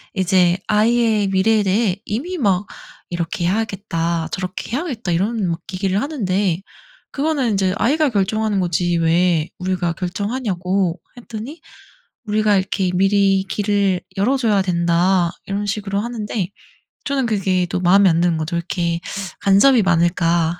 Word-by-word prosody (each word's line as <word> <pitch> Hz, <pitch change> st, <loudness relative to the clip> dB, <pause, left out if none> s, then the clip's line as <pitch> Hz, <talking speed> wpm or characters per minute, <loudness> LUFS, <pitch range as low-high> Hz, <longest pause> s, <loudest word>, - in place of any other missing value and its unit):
이제 185 Hz, -2 st, +3 dB
아이의 220 Hz, -1 st, +2 dB
미래에 205 Hz, +3 st, +2 dB
대해 195 Hz, 0 st, +1 dB
이미 315 Hz, -, -3 dB
막 200 Hz, -, +1 dB, 0.4 s
"이렇게 175 Hz, 0 st, -3 dB
해야겠다. 175 Hz, -5 st, -1 dB
저렇게 185 Hz, +3 st, -5 dB
해야겠다." 255 Hz, -, -3 dB
이런 200 Hz, +3 st, 0 dB
막 165 Hz, 0 st, -2 dB
얘기를 190 Hz, +1 st, 0 dB
하는데 195 Hz, -, -1 dB, 0.5 s
"그거는 280 Hz, -5 st, 0 dB
이제 190 Hz, -1 st, +1 dB
아이가 295 Hz, +6 st, +2 dB
결정하는 210 Hz, 0 st, 0 dB
거지 175 Hz, -1 st, 0 dB
왜 165 Hz, -1 st, +2 dB
우리가 180 Hz, -2 st, -1 dB
결정하냐."고 190 Hz, -2 st, -2 dB, 0.2 s
했더니 240 Hz, +6 st, -8 dB, 0.6 s
"우리가 210 Hz, -1 st, +2 dB
이렇게 190 Hz, 0 st, -1 dB
미리 195 Hz, 0 st, +3 dB
길을 200 Hz, -3 st, 0 dB, 0.2 s
열어줘야 220 Hz, -2 st, +2 dB
된다." 175 Hz, 0 st, +2 dB, 0.2 s
이런 200 Hz, +1 st, -3 dB
식으로 200 Hz, -1 st, -2 dB
하는데 215 Hz, -4 st, -3 dB, 0.6 s
저는 275 Hz, -2 st, 0 dB
그게 190 Hz, -5 st, 0 dB
또 180 Hz, -, -2 dB
마음에 190 Hz, +2 st, +5 dB
안 165 Hz, +1 st, +2 dB
드는 175 Hz, -2 st, +2 dB
거죠. 160 Hz, +2 st, -3 dB
'왜 -, -, +1 dB
이렇게 170 Hz, -1 st, -2 dB, 0.4 s
간섭이 220 Hz, +5 st, +5 dB
많을까.' 170 Hz, -1 st, +1 dB
195 Hz, 320 characters per minute, -19 LUFS, 175-215 Hz, 0.6 s, 마음에